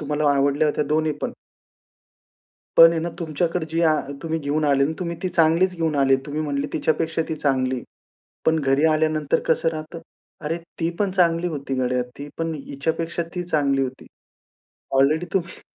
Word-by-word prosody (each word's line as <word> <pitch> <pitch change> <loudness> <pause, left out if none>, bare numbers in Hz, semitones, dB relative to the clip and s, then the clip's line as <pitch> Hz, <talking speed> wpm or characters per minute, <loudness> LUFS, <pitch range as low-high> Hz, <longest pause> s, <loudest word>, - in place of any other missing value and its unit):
तुम्हाला 150 0 +1
आवडल्या 140 +2 +2
होत्या 150 - 0
दोन्ही 155 +1 +1
पण. - - -2 1.4
पण 165 0 +10
आहे 165 - -1
ना, 170 - -2
तुमच्याकडे 165 0 -1
जी 165 +1 0
आ 155 -2 +4 0.3
तुम्ही 160 -1 -2
घेऊन 150 +1 -1
आले 140 -1 +3
ना, 155 - -1
तुम्ही 170 -2 -3
ती 185 - 0
चांगलीच 170 +3 +3
घेऊन 160 -2 0
आले. 135 -1 +4
तुम्ही 150 +2 -3
म्हणले, 145 -1 -2
"तिच्यापेक्षा 160 +1 0
ती 160 - -1
चांगली." 130 -4 0 0.7
पण 160 - +4
घरी 140 +2 +2
आल्यानंतर 155 -1 +1
कसं 160 0 +2
राहतं? 155 +1 -7 0.4
"अरे, 160 +3 -2 0.2
ती 165 0 +1
पण 200 -2 +1
चांगली 175 -2 +2
होती 140 -5 -4
गड्या, 125 0 +1 0.2
ती 145 - -7
पण 165 0 -2
हिच्यापेक्षा 160 +4 -3
ती 180 - -2
चांगली 140 -5 +1
होती." 130 0 -5 0.9
ऑलरेडी 155 +5 +3
तुम्ही 175 -3 -2
155 Hz, 170 wpm, -23 LUFS, 140-165 Hz, 1.4 s, पण